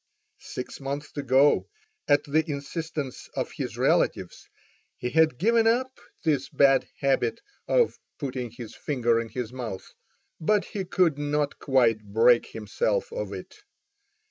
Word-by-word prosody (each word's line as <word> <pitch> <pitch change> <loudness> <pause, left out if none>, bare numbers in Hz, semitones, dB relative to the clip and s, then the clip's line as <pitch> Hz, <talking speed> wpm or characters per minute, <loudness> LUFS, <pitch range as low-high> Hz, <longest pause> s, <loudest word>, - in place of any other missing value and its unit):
Six 125 - -7
months 140 +2 -5
ago, 140 0 +3 0.4
at 145 0 +4
the 155 +2 +2
instance 150 -1 -5
of - - -2
his - - -5
relatives, - - 0 0.5
he 125 - -3
had 160 -5 +3
given 225 - +3
up 255 +3 +1 0.2
this 145 -4 +1
bad 135 -1 +4
habit 135 -4 +1 0.3
of 485 -2 +2 0.2
putting 130 -4 -4
his 115 -1 -9
finger 120 -5 0
in 115 - -7
his 125 -1 -5
mouth, 115 -7 -6 0.5
but 205 +5 +2
he 195 -2 -4
could 170 -5 +2
not 145 0 -1
quite 120 -6 +3
break 115 +4 +4
himself 480 - -2
of - - -4
it. - - -8
140 Hz, 135 wpm, -26 LUFS, 125-160 Hz, 0.5 s, at